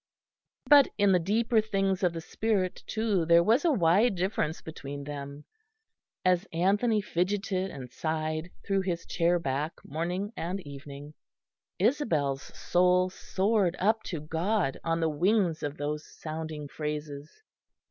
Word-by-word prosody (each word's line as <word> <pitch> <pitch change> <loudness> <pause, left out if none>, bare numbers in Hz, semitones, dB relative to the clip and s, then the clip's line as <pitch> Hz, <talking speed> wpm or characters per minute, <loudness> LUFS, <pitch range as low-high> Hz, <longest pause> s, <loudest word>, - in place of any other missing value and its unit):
But 290 -2 +8
in 205 -1 +4
the 180 - +5
deeper 220 +6 +2
things 195 -3 0
of 180 -3 +2
the 165 - -5
spirit, 195 0 -1
too, 215 -5 0
there 170 +1 +5
was 230 - +3
a 340 - +4
wide 200 - +3
difference 180 -3 -1
between 140 -3 -7
them. 140 0 -7 0.8
As 185 +2 +3
Anthony 205 +6 +2
fidgeted 190 0 -1
and 130 -6 -9
sighed 155 +3 -2 0.2
through 195 -1 +1
his 175 -3 -3
chair 170 +1 +2
back 150 0 -2
morning 180 +8 -3
and 180 +4 -3
evening, 140 0 -10 0.6
Isabel's 165 - +1 0.2
soul 180 +1 +3
soared 190 -1 0
up 220 +4 +2
to 170 - -4
God 165 +2 -1
on 165 0 0
the 165 - +2
wings 175 +2 +1
of 145 0 -4
those 150 +1 -3
sounding 155 -1 -6
phrases. 150 0 -5
175 Hz, 135 wpm, -29 LUFS, 155-200 Hz, 0.8 s, But